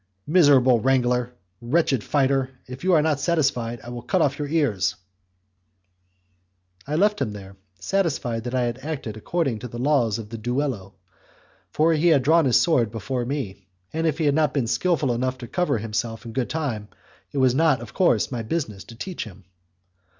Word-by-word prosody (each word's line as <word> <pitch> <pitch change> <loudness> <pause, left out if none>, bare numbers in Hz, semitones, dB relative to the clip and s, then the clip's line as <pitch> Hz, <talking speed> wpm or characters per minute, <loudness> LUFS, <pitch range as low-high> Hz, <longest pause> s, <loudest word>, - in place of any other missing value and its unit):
"Miserable 140 -7 +5
wrangler, 125 0 +1 0.3
wretched 135 -2 +1
fighter, 135 -2 +1 0.2
if 130 +3 -9
you 185 0 +3
are 155 -3 +5
not 155 -3 +1
satisfied, 135 -8 0
I 120 - -9
will 120 0 -6
cut 150 +10 0
off 140 -3 +1
your 145 - -2
ears!" 130 - +1 1.9
I 150 - -2
left 210 +5 +2
him 105 - -1
there, 100 -1 -10 0.2
satisfied 125 - -1
that 125 +1 -3
I 125 - +2
had 120 +1 -2
acted 135 -7 -5
according 135 +1 -1
to 125 - -6
the 120 - -8
laws 125 -5 +2
of 110 -2 -8
the 115 0 -7
duello, 120 -4 -2 0.7
for 160 +2 +2
he 160 +2 +2
had 150 -6 +4
drawn 160 +3 +4
his 125 - +4
sword 130 -10 +2
before 120 +3 -3
me, 105 -8 -5 0.3
and 160 +1 0
if 155 -2 0
he 160 - 0
had 145 - +3
not 150 -1 +1
been 135 -4 +1
skilful 145 +1 +1
enough 130 +2 -1
to 125 -2 -8
cover 175 -5 0
himself 115 +2 -3
in 115 - -7
good 125 -1 -1
time, 125 -10 -3 0.4
it - - -6
was 130 -2 +4
not, 155 -1 +3
of 115 -2 -10
course, 130 - +2
my 120 -3 -3
business 110 -6 -3
to 115 - -12
teach 180 +7 -5
him. 100 -2 -13
130 Hz, 185 wpm, -24 LUFS, 115-150 Hz, 1.9 s, Miserable